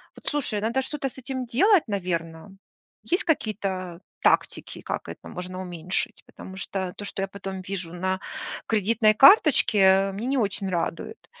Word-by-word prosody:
Вот - - -16
слушай, 270 -8 0
надо 235 +5 0
что-то 270 +1 -3
с - - -13
этим 260 -1 -4
делать, 355 - +4
наверное. 170 -3 -3 0.5
Есть 355 - 0
какие-то 195 - -2 0.2
тактики, - - +1
как - - -4
это - - -9
можно 185 +1 -6
уменьшить? 180 0 -3
Потому 190 - -11
что 190 -1 -3
то, 205 - -6
что 195 - -4
я 195 - -1
потом 195 -1 -7
вижу 185 -3 -5
на 185 +1 -1 0.5
кредитной 215 0 +3
карточке, 205 - +6
мне 215 +5 -5
не 270 +1 +1
очень 200 -2 -1
радует. 175 - -3
195 Hz, 155 wpm, -25 LUFS, 185-245 Hz, 0.5 s, карточке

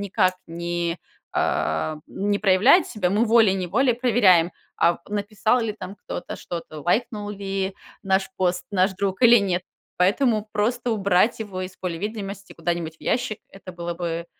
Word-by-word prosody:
никак 185 -2 +1
не, 170 0 -3 0.3
а, 80 - 0
не 205 +1 -1
проявляет 215 - +5
себя, 190 -6 -1
мы 210 +4 +3
волей-неволей 220 +2 +3
проверяем, 205 -9 +4 0.3
а, 170 - +4
в - - -18
написал 210 +3 +1
ли 225 -2 -1
там 195 -2 -8
кто-то 195 - -6
что-то, 165 -3 -7
лайкнул 205 - -1
ли 195 -1 -3 0.3
наш 190 +1 +1
пост 180 -1 0
наш 190 -1 +2
друг 195 0 -2
или 240 0 +8
нет. 185 -3 0 0.4
Поэтому 215 +3 +2
просто 235 +4 0
убрать 200 0 +2
его 200 -4 -5
из 185 0 -7
поля 175 -3 -4
видимости 200 0 -5
куда-нибудь 170 -1 -3
в - - -54
ящик- 245 -3 -1
это 195 -1 -11
было 175 0 -4
бы 170 -1 -3
195 Hz, 155 wpm, -24 LUFS, 180-215 Hz, 0.4 s, или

